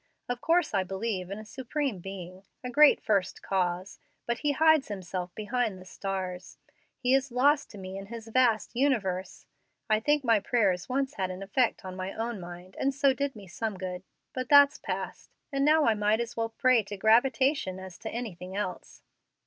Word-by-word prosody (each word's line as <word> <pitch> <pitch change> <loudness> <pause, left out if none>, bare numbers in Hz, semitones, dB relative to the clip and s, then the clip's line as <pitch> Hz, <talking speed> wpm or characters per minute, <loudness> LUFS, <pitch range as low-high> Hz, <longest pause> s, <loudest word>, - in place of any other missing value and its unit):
Of 245 0 -3
course 335 -3 +2
I 195 -2 +2
believe 190 -1 -3
in 200 - -5
a 215 - -9
Supreme 260 -1 -3
Being 185 0 -8 0.2
a 250 - -4
great 300 +3 +6
First 200 -4 0
Cause; 185 0 -1 0.3
but 235 0 -1
He 295 -1 +1
hides 315 -1 +4
Himself 185 -3 -4
behind 220 -1 -1
the 185 - -12
stars; 185 -1 -5 0.4
He 250 0 +1
is 270 0 +2
lost 280 +4 +3
to 210 - -11
me 190 0 -7
in 195 - -9
His 230 0 -8
vast 235 -2 +2
universe. 210 -9 0 0.5
I 215 - +5
think 295 +5 +2
my 230 -4 +4
prayers 200 -3 +1
once 270 +2 0
had 190 -6 -2
an 185 +1 -6
effect 220 +2 0
on 185 0 -6
my 185 +1 -4
own 230 -1 -3
mind, 175 +1 -10
and 270 0 0
so 275 -1 +4
did 280 0 -2
me 205 -2 -10
some 205 +3 -4
good. 180 -1 -5 0.3
But 255 -1 -4
that's 285 -1 +7
past, - - -5 0.2
and 275 -1 0
now 305 +1 +5
I 225 - +4
might 210 +1 +1
as 235 -1 -4
well 225 0 -1
pray 255 +1 +3
to 205 0 -8
gravitation 240 -1 +3
as 190 -2 -10
to 225 - -5
anything 195 -6 -6
else." 200 -3 -5
220 Hz, 190 wpm, -29 LUFS, 190-260 Hz, 0.5 s, that's